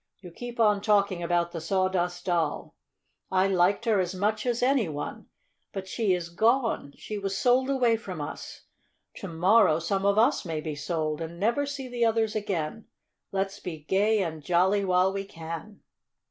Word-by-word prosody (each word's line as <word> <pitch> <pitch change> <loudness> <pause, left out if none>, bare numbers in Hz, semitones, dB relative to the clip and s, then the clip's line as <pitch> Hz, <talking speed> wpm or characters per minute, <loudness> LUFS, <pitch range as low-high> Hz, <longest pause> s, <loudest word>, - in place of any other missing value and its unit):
You 180 -3 -11
keep 240 +6 -8
on 210 -3 +4
talking 200 -4 +2
about 170 0 0
the 165 - -5
Sawdust 180 0 0
Doll. 170 -4 -1 0.6
I 190 0 +3
liked 195 +4 +2
her 220 -4 +3
as 185 0 -1
much 215 +4 -1
as 240 0 0
any 255 -7 +2
one. 145 -1 -6 0.5
But 190 -1 -5
she 200 -2 +1
is 175 -1 -5
gone 225 - +1
she 210 -1 -6
was 195 -1 -2
sold 255 +3 +3
away 245 -4 +3
from 185 -6 -7
us. 145 - -7 0.5
To - - -6
morrow 170 0 +4
some 195 +4 -1
of 200 +1 +3
us 225 - +3
may 160 -3 -3
be 155 0 -4
sold, 155 +1 -2
and 165 +1 -6
never 235 +8 +1
see 280 -2 -5
the 245 -1 -2
others 225 -1 +1
again. 200 -1 -3 0.5
Let's 195 +1 -2
be 170 -3 -6
gay 205 +5 +2
and 160 -3 -5
jolly 185 +5 +2
while 185 0 +2
we 195 0 -3
can!" 165 +3 -8
195 Hz, 175 wpm, -27 LUFS, 170-220 Hz, 0.6 s, on